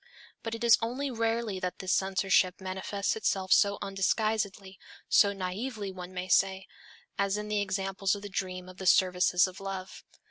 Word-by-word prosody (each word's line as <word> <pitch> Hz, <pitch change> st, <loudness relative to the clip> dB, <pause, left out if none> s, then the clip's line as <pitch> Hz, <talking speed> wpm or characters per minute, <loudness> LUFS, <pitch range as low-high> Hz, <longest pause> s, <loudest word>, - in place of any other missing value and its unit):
But 225 Hz, 0 st, -4 dB
it 230 Hz, -, -6 dB
is 235 Hz, -2 st, +6 dB
only 260 Hz, +5 st, -2 dB
rarely 225 Hz, -3 st, -1 dB
that 180 Hz, -1 st, -3 dB
this 185 Hz, -1 st, -1 dB
censorship 190 Hz, -1 st, +2 dB
manifests 190 Hz, +1 st, -2 dB
itself 190 Hz, -3 st, +1 dB
so 200 Hz, -1 st, +4 dB
undisguisedly, 195 Hz, -1 st, -1 dB, 0.3 s
so 200 Hz, -, +5 dB
naively 200 Hz, +3 st, -4 dB
one 180 Hz, -1 st, -8 dB
may 185 Hz, 0 st, -5 dB
say, 190 Hz, +1 st, +2 dB, 0.5 s
as 200 Hz, 0 st, +1 dB
in 210 Hz, 0 st, -5 dB
the 210 Hz, -1 st, +1 dB
example 195 Hz, 0 st, -3 dB
of 200 Hz, -, -9 dB
the -, -, -5 dB
dream 185 Hz, -2 st, -4 dB
of 185 Hz, 0 st, -12 dB
the 190 Hz, -, -4 dB
"services 180 Hz, 0 st, +4 dB
of 185 Hz, -1 st, -7 dB
love." 195 Hz, -1 st, -6 dB
195 Hz, 170 wpm, -29 LUFS, 185-210 Hz, 0.5 s, is